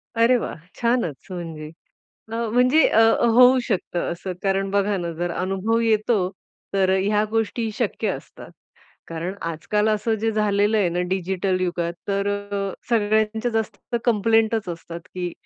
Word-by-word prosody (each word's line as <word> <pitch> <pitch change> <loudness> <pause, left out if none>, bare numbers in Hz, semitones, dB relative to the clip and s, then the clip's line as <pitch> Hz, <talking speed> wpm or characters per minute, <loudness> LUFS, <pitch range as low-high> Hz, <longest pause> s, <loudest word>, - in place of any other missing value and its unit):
अरे 230 +2 +4
वाह! - - -4 0.2
छानच 235 - 0
म्हणजे 165 -4 -6 0.7
अ, - - -2 0.2
म्हणजे 255 +6 +5
अ, 225 - +4 0.4
होऊ 250 +1 +7
शकतं 175 -4 -1
असं. 185 +2 -5
कारण 195 0 0
बघा 200 0 +1
ना, 170 -2 -3
जर 175 +2 -3
अनुभव 195 +5 0
येतो 220 0 +2 0.6
तर 190 -1 +3
ह्या 210 +2 +2
गोष्टी 225 +1 -1
शक्य - - -1
असतात. - - -7 0.6
कारण 170 +3 -4
आजकाल 210 +6 0
असं 215 +1 +1
जे 225 0 +1
झालेलं 210 0 +2
आहे 190 - +2
ना, 175 +1 -1
डिजिटल 190 0 -1
युगात 175 -2 -1 0.2
तर 200 0 0 0.6
सगळ्यांच्या 220 +1 +1
जास्त 225 +2 -3
कंप्लेंटच 225 -2 +2
असतात 170 0 -7
की 180 -1 -3
205 Hz, 140 wpm, -23 LUFS, 185-225 Hz, 0.7 s, होऊ